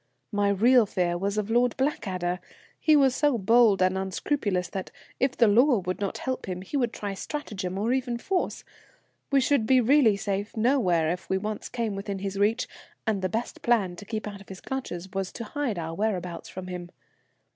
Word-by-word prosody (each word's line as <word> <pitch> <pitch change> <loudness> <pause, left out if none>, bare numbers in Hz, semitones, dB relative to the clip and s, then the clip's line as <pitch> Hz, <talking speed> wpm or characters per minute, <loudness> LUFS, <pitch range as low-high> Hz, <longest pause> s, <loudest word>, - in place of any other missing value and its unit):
My 205 -1 +2
real 230 +3 +5
fear 175 -2 0
was 200 +3 -2
of 210 +1 -1
Lord 240 0 +2
Blackadder. 185 -10 -1 0.4
He 310 -1 +4
was 270 -3 +4
so 290 -4 +2
bold 220 -1 +5
and 185 0 +2
unscrupulous 190 -1 -1
that, 190 +1 -5 0.3
if 260 0 +1
the 235 - +5
law 245 +5 +5
would 185 -1 -3
not 200 - -2
help 260 -4 -3
him, 185 0 -4
he 195 - -7
would 245 -4 +1
try 205 -3 -4
stratagem, 195 -6 -4
or 225 +5 +1
even 250 -2 -1
force. 365 +9 -2 0.7
We 275 - +5
should 260 -4 +2
be 260 +1 +6
really 245 -4 +5
safe 200 +1 -3
nowhere 195 - +2
if 180 - -5
we 190 - +2
once 210 +2 -4
came 230 -4 -2
within 195 0 -4
his 195 0 -4
reach, 220 +5 +2 0.4
and, 210 -3 0
the 185 - 0
best 225 +2 -3
plan 210 -7 +2
to 205 - -9
keep 215 0 -4
out 200 -1 -7
of 200 - -16
his 190 -1 -8
clutches 190 -10 -5
was 195 -1 -2
to 235 - -5
hide 245 -2 -2
our 165 -1 -4
whereabouts 180 -3 -2
from 185 0 -7
him. 180 -1 -6
210 Hz, 200 wpm, -27 LUFS, 190-245 Hz, 0.7 s, be